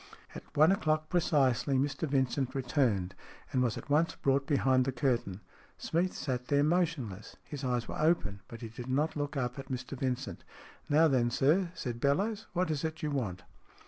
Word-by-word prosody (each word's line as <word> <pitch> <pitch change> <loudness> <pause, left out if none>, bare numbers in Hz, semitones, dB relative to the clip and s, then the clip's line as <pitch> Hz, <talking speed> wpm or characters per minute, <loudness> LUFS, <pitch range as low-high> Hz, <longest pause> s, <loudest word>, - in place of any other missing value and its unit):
At - - -11
one 155 +4 +7
o'clock 155 -6 +1
precisely 140 -6 +2
Mr 140 +3 -1
Vincent 135 0 0
returned, 125 - +1 0.4
and 130 - +2
was 120 -4 +1
at - - -8
once 155 +3 +2
brought 135 0 +1
behind 130 -3 +3
the 135 - 0
curtain. 120 -8 -1 0.4
Smeath 175 +3 0
sat 125 -3 -3
there 145 0 +3
motionless. 155 - -1
His 145 -2 -7
eyes 125 -2 -1
were - - -5
open, 155 - +1
but 115 - -10
he 115 - -6
did 120 +3 -8
not 145 +5 +1
look 145 -1 -3
up 125 0 -2
at 135 - -8
Mr 130 -1 -5
Vincent. 130 0 -3 0.5
"Now 155 +2 +5
then, 125 -5 +2
sir," 160 +9 +2
said 120 -6 -4
Bellowes. 200 +10 +1
"What 180 -2 0
is 150 -3 -2
it 160 0 -4
you 150 - -1
want?" 100 -11 -2
135 Hz, 180 wpm, -31 LUFS, 125-155 Hz, 0.5 s, one